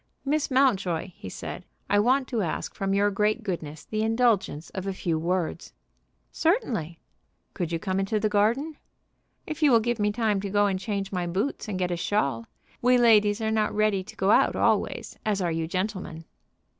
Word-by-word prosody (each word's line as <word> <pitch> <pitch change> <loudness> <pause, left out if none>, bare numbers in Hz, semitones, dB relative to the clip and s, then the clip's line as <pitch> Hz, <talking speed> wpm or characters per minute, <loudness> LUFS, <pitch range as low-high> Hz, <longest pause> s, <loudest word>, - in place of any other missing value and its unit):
"Miss 295 +2 0
Mountjoy," 200 - +1
he 95 - -9
said, - - -7 0.2
"I 205 - +3
want 255 +5 +2
to 235 -4 -1
ask 170 -5 -3
from 195 0 -1
your 205 +1 +3
great 210 +3 0
goodness 160 -6 -5
the 215 0 -2
indulgence 225 -8 +1
of 190 0 -5
a 195 - -1
few 170 -3 -1
words." 175 +1 -2 0.6
"Certainly." 235 - 0 0.6
"Could 175 -2 -3
you 165 - 0
come 185 +3 -2
into 195 +2 0
the 215 - +1
garden?" 235 +9 +1 0.7
"If 310 0 -6
you 300 - +6
will 235 -3 +6
give 240 +1 -1
me 210 0 +2
time 210 -3 0
to 200 - -4
go 205 +1 +3
and 190 -2 0
change 195 -1 -3
my 180 -2 -2
boots 195 +12 -2
and 195 - -2
get 180 -1 -1
a 175 - -1
shawl. 140 - -1 0.3
We 250 +1 +5
ladies 215 -3 +4
are 220 0 0
not 215 -1 0
ready 210 -2 +2
to - - -11
go 195 +2 +2
out - - +4
always, - - 0
as 210 -2 0
are 175 -3 0
you 160 0 -2
gentlemen." 185 -3 -4
205 Hz, 195 wpm, -26 LUFS, 185-225 Hz, 0.7 s, you